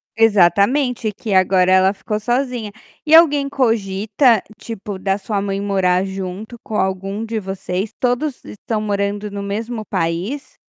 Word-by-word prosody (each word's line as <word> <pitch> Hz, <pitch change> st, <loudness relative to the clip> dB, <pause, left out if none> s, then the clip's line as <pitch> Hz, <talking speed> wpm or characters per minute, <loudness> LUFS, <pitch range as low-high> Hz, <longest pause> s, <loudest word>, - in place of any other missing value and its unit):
Exatamente, 225 Hz, -, +3 dB
que 210 Hz, 0 st, -5 dB
agora 185 Hz, -1 st, +4 dB
ela 190 Hz, 0 st, +5 dB
ficou 210 Hz, +1 st, -4 dB
sozinha. 240 Hz, -1 st, -2 dB, 0.3 s
E 315 Hz, +1 st, +5 dB
alguém 290 Hz, -4 st, +5 dB
cogita, 225 Hz, -1 st, +2 dB, 0.2 s
tipo, 205 Hz, -3 st, -7 dB
da 195 Hz, +1 st, 0 dB
sua 205 Hz, 0 st, -2 dB
mãe 195 Hz, 0 st, -2 dB
morar 190 Hz, -2 st, +1 dB
junto 195 Hz, +4 st, -6 dB
com 220 Hz, -, -6 dB
algum 195 Hz, +2 st, -2 dB
de 225 Hz, 0 st, -3 dB
vocês? 190 Hz, 0 st, -4 dB
Todos 250 Hz, +3 st, -1 dB
estão 215 Hz, +1 st, -4 dB
morando 205 Hz, 0 st, -2 dB
no 200 Hz, 0 st, -5 dB
mesmo 220 Hz, +3 st, -4 dB
país? 185 Hz, -, -3 dB
205 Hz, 140 wpm, -19 LUFS, 195-230 Hz, 0.3 s, ela